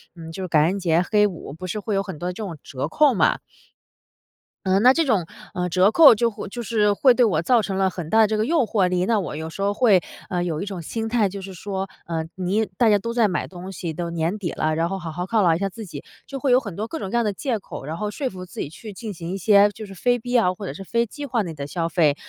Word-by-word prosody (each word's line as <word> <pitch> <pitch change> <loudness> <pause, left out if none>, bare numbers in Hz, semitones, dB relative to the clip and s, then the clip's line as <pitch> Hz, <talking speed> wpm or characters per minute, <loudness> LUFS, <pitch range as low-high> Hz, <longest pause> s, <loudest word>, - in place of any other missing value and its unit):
嗯， 165 -1 -9
就 190 +3 -6
是 - - -3
感 155 -3 +4
恩 190 +4 0
节 170 -2 +2
黑 210 -1 +4
五 175 -7 -8
不 185 +4 -7
是 195 +4 -3
会 210 0 -2
有 195 - +1
很 190 -5 -7
多 175 - -3
的 - - -4
这 215 - -6
种 170 -6 -6
折 135 +1 -4
扣 290 - +4
嘛。 210 - +3 1.3
嗯， 190 +1 +3
那 250 - +8
这 330 +3 +1
种， 215 - +1 0.3
呃， 180 0 -2
折 185 +4 +4
扣 300 0 +9
就 230 +2 +1
会 210 -2 -7
就 240 +4 -6
是 215 -2 +2
会 250 +5 +5
对 245 - +3
我 180 -8 +1
造 235 +6 +3
成 195 -2 -3
了 190 0 +2
很 175 -4 -7
大 220 - +3
的 220 - +5
这 215 - -1
个 215 - +1
诱 310 -1 +2
惑 200 -4 +1
力， 180 0 +1
那 225 +2 +2
我 185 - -4
有 160 +1 -5
时 180 - -8
候 200 +1 +1
会 205 -5 +4 0.3
呃， 175 -1 -1
有 160 -3 -2
一 - - -3
种 195 -4 -5
心 225 +7 -4
态， 225 -3 +2
就 200 +1 -7
是 190 0 -8
说， 195 +1 -4 0.2
呃， 165 -1 -3
你 190 +4 0
大 235 - +4
家 205 -1 +4
都 230 +3 -4
在 235 -2 +3
买 180 - -2
东 185 +1 -9
西， 170 -3 -5
都 170 +2 -4
年 170 +4 -1
底 185 -5 -3
了， 155 0 -1
然 165 +1 0
后 195 +1 -3
好 170 -2 -6
好 175 +3 -4
犒 220 +3 +1
劳 170 -4 +4
一 - - -1
下 195 +2 -1
自 220 +2 -9
己， 170 - -8 0.2
就 275 - -6
会 270 -1 +1
有 250 - +6
很 205 -9 -8
多 210 - -3
各 320 - -5
种 195 - -4
各 235 - -3
样 235 - +3
的 210 - 0
借 240 +4 -2
口， 190 - -9
然 155 +3 -4
后 210 +4 -3
说 270 +5 -3
服 185 -3 -8
自 180 - -11
己 - - -2
去 210 +8 -10
进 210 +1 -7
行 170 -1 -6
一 190 - -3
些 200 +1 +5
就 215 +1 -9
是 195 -1 -11
非 245 +5 +1
必 245 +2 -7
要 230 -7 +3
或 200 +2 -8
者 - - -4
是 195 - -8
非 235 +4 0
计 290 +6 -7
划 240 -4 0
内 170 -4 -6
的 145 -2 -6
消 165 +3 -2
费。 160 -4 +2
195 Hz, 325 characters per minute, -23 LUFS, 175-220 Hz, 1.3 s, 扣